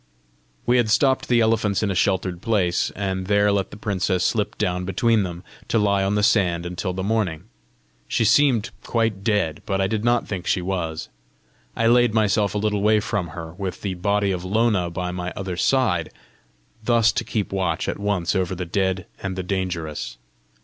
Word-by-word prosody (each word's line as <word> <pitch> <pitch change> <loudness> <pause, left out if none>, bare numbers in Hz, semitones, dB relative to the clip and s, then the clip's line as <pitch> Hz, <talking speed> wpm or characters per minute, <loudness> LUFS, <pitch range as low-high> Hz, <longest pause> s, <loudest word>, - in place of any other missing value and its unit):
We 125 - +3
had 120 -3 +2
stopped 130 +4 +3
the 120 -1 +3
elephants 110 -2 +1
in 100 - +1
a - - 0
sheltered 95 -2 0
place, 95 -6 +1
and 95 -2 -3
there 100 0 +3
let 100 -1 0
the - - -10
princess 95 -3 0
slip 105 -3 0
down 90 0 -1
between 110 +4 +2
them, 90 -2 -5 0.2
to - - +1
lie 100 -2 +2
on 100 +1 0
the 105 - +1
sand 90 -6 +2
until 90 +2 -3
the 95 +1 -4
morning. 100 -6 -1 0.6
She 120 -3 +1
seemed 125 -3 +3
quite 115 -4 -1
dead, 95 -8 0
but 95 -1 0
I 95 - +2
did 105 +2 -1
not 120 0 +2
think 95 -3 -5
she - - +2
was. 90 -3 -3 0.7
I 115 - 0
laid 120 -1 +4
myself 105 -1 +2
a - - +1
little 105 -1 0
way 105 +1 +4
from 105 -4 -2
her, 80 -1 -6
with 95 0 -5
the 100 -2 -1
body 100 +2 0
of 90 -2 -3
Lona 100 -2 +1
by 90 +1 -3
my 90 0 -4
other 95 -2 -4
side, 90 -6 +1 0.7
thus 115 -1 +4
to - - -2
keep 105 -3 -3
watch 90 -4 -1
at - - -3
once 100 -3 0
over 95 -1 0
the 90 0 -4
dead 95 +1 -1 0.2
and 95 -1 -3
the 95 - -3
dangerous. 90 -8 -3
100 Hz, 190 wpm, -23 LUFS, 90-110 Hz, 0.7 s, laid